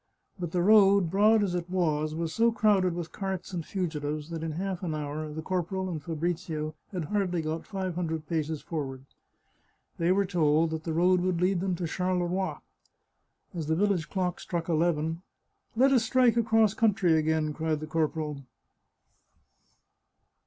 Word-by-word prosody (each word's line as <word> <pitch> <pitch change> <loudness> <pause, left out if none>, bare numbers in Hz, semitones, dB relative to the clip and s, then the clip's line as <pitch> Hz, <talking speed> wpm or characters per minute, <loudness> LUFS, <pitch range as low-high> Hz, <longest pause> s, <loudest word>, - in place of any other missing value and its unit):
But 175 -2 -4
the 175 0 +1
road, 200 -3 +5
broad 210 +2 +4
as 190 -3 -1
it 175 0 -3
was, 155 -4 0
was 165 0 -3
so 230 +1 +3
crowded 205 -5 +2
with 170 -2 -5
carts 190 -2 -4
and 170 -2 -2
fugitives 155 -4 -3
that 165 -1 -4
in 160 -1 -3
half 185 +2 -3
an 165 -4 -2
hour 150 +1 -4
the 155 +1 -6
corporal 185 +1 -2
and 160 -3 -4
Fabrizio 160 -1 -3 0.2
had 180 -5 -3
hardly 180 -2 -1
got 155 +1 -4
five 190 -3 -3
hundred 160 -2 -3
paces 160 -2 -2
forward. 135 -5 -5 0.9
They 170 +1 +2
were 200 +1 +3
told 160 -3 +2
that 160 0 -4
the 165 - -2
road 180 +2 +3
would 180 -2 0
lead 180 +1 +2
them 185 0 -1
to 175 0 -3
Charleroi. 180 +2 -1 1.0
As 165 -4 -4
the 160 - +2
village 195 -3 +1
clock 180 -3 -2
struck 170 -2 -4
eleven 165 0 0 0.2
— - - -50
" - - -43
Let 265 +4 +4
us 250 -4 +4
strike 245 0 +3
across 225 -3 +3
country 200 -7 +3
again," 155 -1 +1
cried 160 0 -1
the 155 - -5
cor 155 0 +1
poral. 150 -3 -5
175 Hz, 175 wpm, -28 LUFS, 160-190 Hz, 1.0 s, road